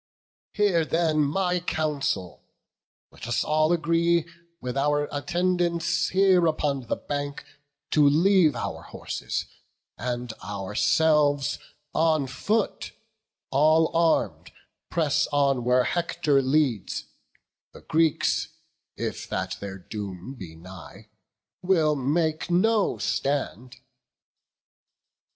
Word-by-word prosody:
Hear 195 -6 +2
then 160 -1 +1
my 180 +5 0
counsel; 150 - -2 0.7
let - - -10
us 120 - 0
all 155 +1 +2
agree 170 0 +2 0.3
With 125 -3 -5
our 145 +1 +1
attendants 170 +3 0
here 185 -2 +4
upon 140 -5 -1
the - - 0
bank 145 -1 -5 0.5
To 150 -2 +5
leave 165 -1 +4
our 120 - -4
horses; - - -5 0.5
and 120 0 -3
ourselves 145 +9 +1 0.3
on 160 -3 +2
foot, 200 - -2 0.6
All 155 +4 +3
arm'd, 165 -1 +1 0.4
press 155 -4 +1
on 140 -3 +1
where 125 +1 +3
Hector 170 -3 +1
leads; 130 -6 0 0.7
the - - -14
Greeks, 160 -1 +1 0.5
If - - -4
that 95 0 -3
their 100 -1 -6
doom 95 +3 -7
be 95 -11 -10
nigh, 90 +2 -12 0.5
will 165 -5 +2
make 155 +4 0
no 205 +4 +2
stand." 130 -3 -2
150 Hz, 100 wpm, -25 LUFS, 130-170 Hz, 0.7 s, To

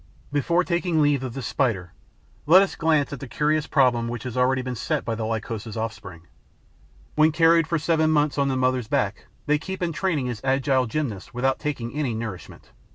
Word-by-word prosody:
Before 170 +5 +2
taking 175 -2 0
leave 145 -3 +3
of 130 -2 -5
this 135 -4 -5
Spider, 100 -10 -1 0.5
let 185 +5 +8
us 195 - -3
glance 155 -3 +1
at 140 - -7
a 135 - -6
curious 150 +4 0
problem 125 -4 +2
which 120 0 -5
has 125 -3 -6
already 130 +1 +2
been 125 0 -4
set 120 - -2
by 115 - -1
the 110 0 -3
Lycosa's 110 0 -4
offspring. 100 -6 -6 0.9
When 155 +1 +4
carried 165 0 +4
for 170 - 0
seven 160 0 +1
months 150 -2 +2
on 140 - +2
the 135 -1 0
mother's 130 -2 0
back, - - -1 0.2
they 150 0 +2
keep 190 +3 -5
in 170 -1 -1
training 155 -8 -1
as 120 -4 -5
agile 130 -1 +1
gymnasts 120 -6 -4
without 130 +2 0
taking 130 -6 -4
any 140 -6 -1
nourishment. 110 -5 -7
135 Hz, 195 wpm, -24 LUFS, 120-155 Hz, 0.9 s, let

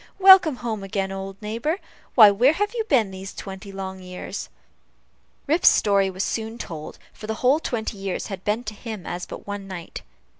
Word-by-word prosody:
Welcome 380 -6 +8
home 230 -4 -4
again, 195 0 -2
old 195 0 -6
neighbor. 230 - -1 0.4
Why, 215 -4 +9
where 245 +9 +4
have 415 +6 -1
you 460 -2 -1
been 235 - +2
these 190 +1 -8
twenty 195 +1 -8
long 190 -1 -6
years?" 180 0 -7 1.0
Rip's 320 +5 +5
story 200 -2 +3
was 190 +1 -3
soon 225 0 -3
told, 160 -9 -7 0.2
for 215 - -10
the 220 - -2
whole 275 +5 +5
twenty 220 -8 -3
years 195 -2 -3
had 195 -2 -7
been 215 +3 0
to 215 - -5
him 215 -3 -7
but - - -7
as 175 0 -5 0.2
one 205 -1 -6
night. 180 -3 -7
205 Hz, 185 wpm, -24 LUFS, 195-240 Hz, 1.0 s, Why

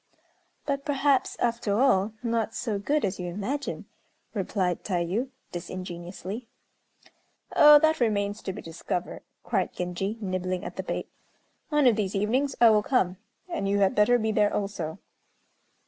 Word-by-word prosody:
"But, 275 -1 -1
perhaps, 280 -2 +1
after 230 -3 0
all, 220 -6 +3
not 230 -1 -1
so 220 -5 -2
good 295 +7 +1
as 190 - -3
you 180 - -3
imagine," 210 +11 -3 0.5
replied 190 -3 -1
Tayû, 190 +7 -1 0.2
disingenuously. 185 +5 -6 1.1
"Oh! 300 0 +9
that 315 +1 +3
remains 205 -3 0
to - - -3
be 200 - -8
discovered," 170 +2 -4 0.2
cried 195 -6 -1
Genji, 180 +4 -3
nibbling 185 -2 -2
at - - -6
the - - -3
bait. - - -4 0.6
"One 295 -2 +3
of 235 -4 +5
these 200 -2 -1
evenings 245 +8 +1
I 235 -2 +8
will 210 -1 +4
come, 190 -6 +1 0.3
and 335 - -2
you 200 - +2
had 195 -1 +3
better 225 +4 +4
be 220 -1 0
there 210 -1 +3
also." 195 -6 -3
210 Hz, 145 wpm, -27 LUFS, 185-245 Hz, 1.1 s, Oh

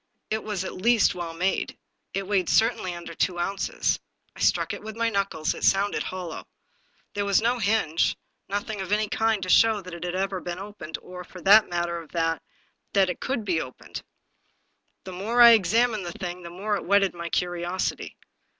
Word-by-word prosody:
It 220 0 -1
was 205 -4 -3
at - - -5
least 230 +3 +3
well 170 -2 -5
made. 185 +3 -1 0.4
It 195 0 -1
weighed 190 -4 +1
certainly 220 -6 +2
under 170 -1 -8
two 175 +2 0
ounces. 195 +3 -1 0.4
I - - -13
struck - - +2
it - - -7
with 220 0 -8
my 230 0 +1
knuckles; 195 -6 0
it - - -9
sounded 200 +1 +2
hollow. 180 -4 -6 0.7
There 205 - -1
was 200 -1 +3
no 240 +2 +1
hinge; 200 -7 +1 0.3
nothing 205 +1 -3
of 190 - -6
any 210 +1 +2
kind 220 -3 +1
to 185 - -4
show 220 +2 +5
that 180 -3 -10
it 170 - -7
ever 190 +2 -2
had - - -15
been 175 0 -3
opened, 195 -5 -7
or, 180 0 -8
for 180 - -12
the 205 +5 +7
matter 170 -1 -1
of 160 - -16
that, 165 -1 0 0.5
that 195 -2 +4
it - - -8
ever - - -4
could 245 -5 -1
be 170 -5 +1
opened. 130 - -8 1.0
The 185 - -8
more 215 +7 -2
I 235 -1 +11
examined 220 0 +3
the 170 - -5
thing, 180 0 -6
the 170 - -8
more 200 +4 -2
it - - -7
whetted 195 0 +3
my 170 -1 -6
curiosity. 175 +1 -2
190 Hz, 195 wpm, -26 LUFS, 175-210 Hz, 1.0 s, I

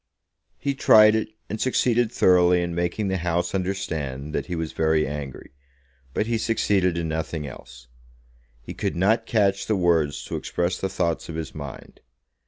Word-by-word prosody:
He 140 - -1
tried 110 -5 +6
it, 110 0 -1 0.2
and 110 - -5
succeeded 120 -2 +2
thoroughly 90 -4 +4
in 85 0 -3
making 90 +4 -1
the 95 - 0
House 85 0 -1
understand 80 -8 -3
that - - -2
he 90 - -3
was 80 -1 -3
very 80 -1 +2
angry, 70 -2 -7 0.6
but - - +1
he 115 0 -1
succeeded 100 -6 +1
in 85 -1 -2
nothing 80 -1 -3
else. 65 -2 -11 0.8
He - - -7
could - - -3
not 100 +6 +2
catch 100 -3 +1
the 110 - +2
words 85 -6 +1
to - - -4
express 90 +1 -2
the 95 - -1
thoughts 85 -4 -2
of 80 - -5
his 80 -1 -5
mind. 70 -3 -9
90 Hz, 170 wpm, -24 LUFS, 80-100 Hz, 0.8 s, tried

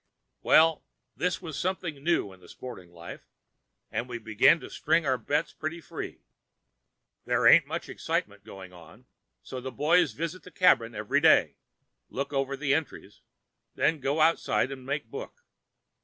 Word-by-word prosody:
Well, 160 0 +4 0.3
this 180 - -2
is 155 -4 -6
something 175 -6 -3
new 165 - 0
in 95 - -17
the 90 - -17
sporting 95 -9 -10
line, 85 0 -10 0.7
and 125 - -3
we 120 - -4
begin 110 +8 +4
to - - -9
string 165 -2 +1
our 130 -2 +1
bets 145 +8 -1
pretty 155 +2 -5
free. 165 - -8 1.0
There - - +1
ain't - - +7
much - - -5
excitement 100 -1 -3
going 95 -3 -11
on, 85 -2 -16 0.4
so 130 - -7
the 130 +1 -6
boys 155 +9 +2
visit 165 +3 -5
the - - -13
cabin 120 -12 +3
every 105 0 0
day, - - +4 0.5
look 140 +2 -4
over 135 0 -1
the 140 -1 +1
entries, 155 0 -4 0.5
then 160 - +1
go 140 +4 0
outside 140 -7 +2
and 130 -1 -9
make 145 +2 -2
book. - - -9
140 Hz, 155 wpm, -28 LUFS, 115-165 Hz, 1.0 s, ain't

